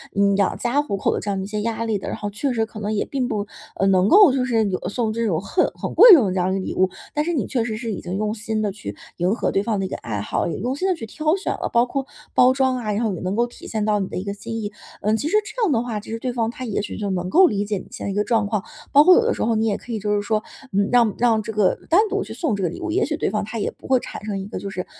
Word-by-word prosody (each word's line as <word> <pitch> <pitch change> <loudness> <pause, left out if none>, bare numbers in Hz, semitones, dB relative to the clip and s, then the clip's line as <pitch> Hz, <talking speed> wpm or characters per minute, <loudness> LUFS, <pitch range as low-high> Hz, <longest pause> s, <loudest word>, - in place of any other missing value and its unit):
嗯， 200 -1 +3
养 200 -2 +1
家 250 +4 +1
糊 290 -9 -3
口 195 - 0
的 - - -1
这 210 - -5
样 200 - -1
的 190 - -3
一 - - -6
些 210 0 -3
压 230 +1 -2
力 220 -2 0
的， 190 - -7
然 - - -3
后 205 - -4
确 250 +6 -2
实 225 -2 +1
可 220 0 -10
能 210 +1 -2
也 205 - 0
并 265 -3 -2
不， 210 -3 -2 0.3
呃， 195 - 0
能 190 0 +4
够 400 - +7
就 255 -1 0
是 225 -4 +1
有 185 - -2
送 220 +2 -1
这 230 +1 -1
种 165 -5 0
很 280 - +1
很 - - -5
贵 475 -4 +10
重 280 -11 +7
的 185 - -1
这 185 - 0
样 180 +1 +1
一 - - -1
个 185 - -4
礼 - - -3
物。 185 0 +2 0.2
但 300 0 0
是 345 - -1
你 290 - 0
确 240 -4 -1
实 220 -2 -3
是 230 0 -4
已 200 - -4
经 180 +1 -5
用 210 +1 -1
心 220 0 -3
地 210 -2 0
去 185 - -7 0.2
迎 180 +4 +1
合 - - -1
对 195 - +1
方 215 0 -1
的 - - -1
一 - - -5
个 - - -4
爱 105 -3 -4
好， - - -1
也 170 - -3
用 245 +6 -2
心 375 - 0
地 375 - +2
去 305 - -7
挑 310 +8 0
选 390 - -3
了， - - -3
包 235 +1 +4
括 270 +2 -3 0.3
包 255 +1 +5
装 260 -1 +1
啊， 215 -4 -2
然 215 +3 -1
后 215 -3 0
也 175 - -5
能 185 +2 -2
够 235 +2 +2
体 240 - -12
现 220 -1 -2
到 210 -1 +2
你 195 - -2
的 - - -8
一 185 - -3
个 200 0 -4
心 225 +3 -7
意。 205 -1 -4 0.3
嗯， 215 +2 +2
其 285 - -2
实 415 - +3
这 485 +4 -6
样 400 - +2
的 230 -4 +2
话， 235 -3 -3
其 210 - -10
实 225 - -3
对 250 +2 -2
方 230 -2 0
他 255 - -8
也 220 - -2
许 - - -6
就 205 -2 -3
能 180 -2 -2
够 370 - +6
理 205 -7 -1
解 205 0 -2
你 - - -12
现 - - -6
在 200 - -2
一 - - -3
个 205 +1 +1
状 220 -1 +1
况。 205 -1 -1 0.3
包 290 +1 +7
括 365 +3 +8
有 - - +5
的 475 - +1
时 - - -6
候 230 0 +1
你 220 +1 +1
也 205 - +1
可 245 - -11
以 225 - -1
就 210 +1 -1
是 205 - 0
说， 215 +1 -1 0.3
嗯， 200 +1 +2
让 235 -4 +4
让 230 -2 +3
这 220 - -5
个 205 -3 +3
单 345 +5 +6
独 405 0 -1
去 - - -8
送 310 - 0
这 200 - -4
个 175 - +1
礼 170 - -8
物， - - -3
也 385 +5 +2
许 305 0 -2
对 - - 0
方 210 -1 -1
他 220 +2 -6
也 - - -1
不 - - -15
会 260 -1 +4
产 - - -8
生 205 -2 -3
一 190 - -5
个 205 - -6
就 200 - -5
是， 185 -1 -5
220 Hz, 375 characters per minute, -22 LUFS, 200-250 Hz, 0.3 s, 贵